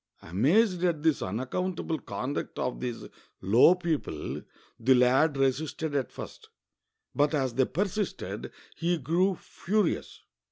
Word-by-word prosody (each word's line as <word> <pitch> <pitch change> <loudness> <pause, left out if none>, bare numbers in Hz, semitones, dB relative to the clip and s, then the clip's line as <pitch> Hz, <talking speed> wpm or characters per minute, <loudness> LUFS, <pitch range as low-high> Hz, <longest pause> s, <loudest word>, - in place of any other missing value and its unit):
Amazed 175 - +2
at 165 -4 +1
this 160 -3 +2
unaccountable 160 - -2
conduct 125 +5 -4
of 125 - -2
these 120 -2 -4 0.4
low 115 - +6
people, 170 -4 -3 0.4
the 130 +3 +4
lad 130 +4 +4
resisted 145 +3 0
at 140 -2 -1
first, 440 - -10 0.6
but 145 +2 +2
as 130 -4 0
they 130 +2 +3
persisted, 200 +8 -3 0.2
he 175 +1 0
grew 175 +7 +1
furious. 205 -1 -2
150 Hz, 120 wpm, -28 LUFS, 130-175 Hz, 0.6 s, low